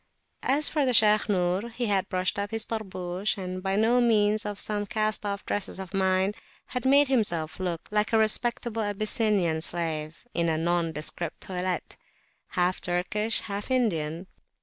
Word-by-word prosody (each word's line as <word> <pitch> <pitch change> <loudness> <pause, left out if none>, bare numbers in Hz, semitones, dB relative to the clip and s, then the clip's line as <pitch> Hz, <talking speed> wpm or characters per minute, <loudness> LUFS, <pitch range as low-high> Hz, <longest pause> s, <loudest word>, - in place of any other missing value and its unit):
As 285 +3 +2
for 285 -4 +1
Shaykh 215 -2 +5
Nur, 185 +3 0
he 240 +1 -3
had 200 -2 0
brushed 185 +1 0
up 200 0 -2
his 225 0 -1
Tarbush, 190 -2 -3
and, 185 -1 -5
by 195 +1 -1
means 220 -2 +3
of 205 -1 -4
some 205 -1 0
cast 215 -2 0
off 200 -1 -4
dresses 205 -2 -2
of 190 0 -7
mine, 190 +1 +2 0.3
had 250 0 -5
made 280 +2 +6
himself 180 -12 0
look 175 -3 -3
like 210 0 +1
a 225 - +4
respectable 225 +1 +1
Abyssinian 205 -5 0
slave, 160 0 -2
in 170 -1 +1
a 160 - +1
nondescript 165 -1 -2
toilette, 180 -1 -3 0.5
half 180 0 0
Turkish, 190 +5 0
half 205 +2 -5
Indian. 175 -10 0
200 Hz, 150 wpm, -27 LUFS, 180-220 Hz, 0.5 s, made